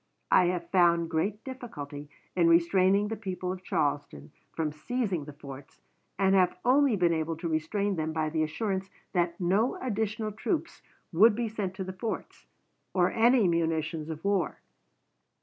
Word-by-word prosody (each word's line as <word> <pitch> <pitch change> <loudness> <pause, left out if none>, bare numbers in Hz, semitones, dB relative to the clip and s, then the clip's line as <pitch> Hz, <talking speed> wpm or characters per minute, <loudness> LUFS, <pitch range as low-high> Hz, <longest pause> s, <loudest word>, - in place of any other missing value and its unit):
I 180 - +6
have 175 -1 -2
found 170 -3 +3
great 195 +6 -1
difficulty 150 - -8 0.3
in 175 -2 +4
restraining 185 +4 +4
the 225 - -2
people 185 -4 -4
of 185 0 -6
Charleston 145 - -2 0.2
from 155 -2 -2
seizing 185 - -2
the 150 - -9
forts, 140 0 -11 0.4
and 195 -1 +3
have 185 -2 +3
only 265 -1 +4
been 175 -3 +2
able 160 0 -1
to 170 - -4
restrain 180 +5 -1
them 160 0 -1
by 155 -1 -1
the 160 0 0
assurance 190 +4 -2 0.2
that 170 -2 0
no 195 +7 +2
additional 215 -2 -2
troops 305 - -3 0.3
would 210 +6 +6
be 235 +1 -1
sent 205 -4 -4
to 190 - -4
the 185 0 -6
forts, 215 +4 -6 0.5
or 180 -1 +3
any 235 -2 +4
munitions 160 -1 -1
of 160 +3 -6
war.... 200 -2 0
180 Hz, 160 wpm, -29 LUFS, 160-210 Hz, 0.5 s, I